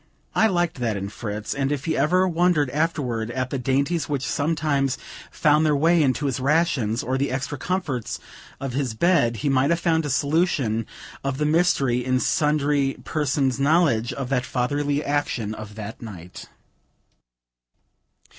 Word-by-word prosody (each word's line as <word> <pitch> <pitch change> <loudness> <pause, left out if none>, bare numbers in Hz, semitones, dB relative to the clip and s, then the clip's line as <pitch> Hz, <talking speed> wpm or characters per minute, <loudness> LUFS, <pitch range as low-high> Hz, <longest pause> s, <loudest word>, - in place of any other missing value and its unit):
I 220 - +4
liked 175 -6 0
that 115 -4 -1
in 100 0 -4
Fritz, 105 0 -5
and 135 0 -1
if 145 -1 -2
he 160 -1 0
ever 185 +4 +3
wondered 170 -5 +2
afterward 130 -7 -1
at 130 +1 -3
the 135 - -2
dainties 140 +6 0
which 140 -2 -1
sometimes 145 -4 0 0.3
found 150 0 +3
their 150 -2 +3
way 165 +4 +4
into 145 +1 +1
his 135 -2 -1
rations, 135 -6 +1
or 130 +1 -1
the 140 - 0
extra 135 +3 -3
comforts 160 - -2 0.4
of 135 -2 -4
his 130 -4 -2
bed, 140 -6 +2
he - - +3
might 135 +1 +3
have 170 0 +2
found 165 -1 +1
a 145 - -3
solution 140 -6 +1 0.4
of 135 -1 -2
the 150 - 0
mystery 150 -6 +2
in 130 0 +1
sundry 145 -2 +1
persons' 140 -3 0
knowledge 140 -6 +3
of 135 -2 -5
the 135 -2 +1
fatherly 145 +4 -1
action 135 -7 -1
of 110 -1 -9
that 110 0 -7
night. 90 -6 -10
140 Hz, 160 wpm, -23 LUFS, 125-155 Hz, 0.4 s, I